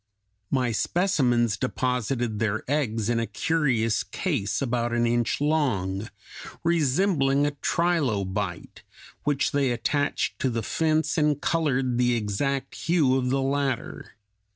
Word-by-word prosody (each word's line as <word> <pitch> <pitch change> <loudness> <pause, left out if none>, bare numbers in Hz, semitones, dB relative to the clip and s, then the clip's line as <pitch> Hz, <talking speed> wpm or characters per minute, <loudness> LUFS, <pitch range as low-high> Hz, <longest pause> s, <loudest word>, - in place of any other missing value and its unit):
My 125 -3 +1
specimens 120 - +1
deposited 125 -3 -1
their 110 -1 -1
eggs 115 -7 0
in 120 0 +1
a 115 - -1
curious 120 -2 +1
case 135 - -2
about 120 -3 -1
an 120 0 +2
inch 120 0 +1
long, 115 -10 0 0.5
resembling 150 -3 +2
a 145 - +1
trilobite, 110 - -1 0.4
which 145 -1 +1
they 140 -2 +1
attached 135 +4 -1
to 130 - +1
the 115 -2 -2
fence 160 - +1
and 150 -2 +2
colored 135 -8 0
the 125 -1 +3
exact 120 +6 -2
hue 155 -7 +2
of 125 -1 0
the 135 +1 +1
latter. 135 -2 -2
130 Hz, 125 wpm, -26 LUFS, 115-145 Hz, 0.5 s, the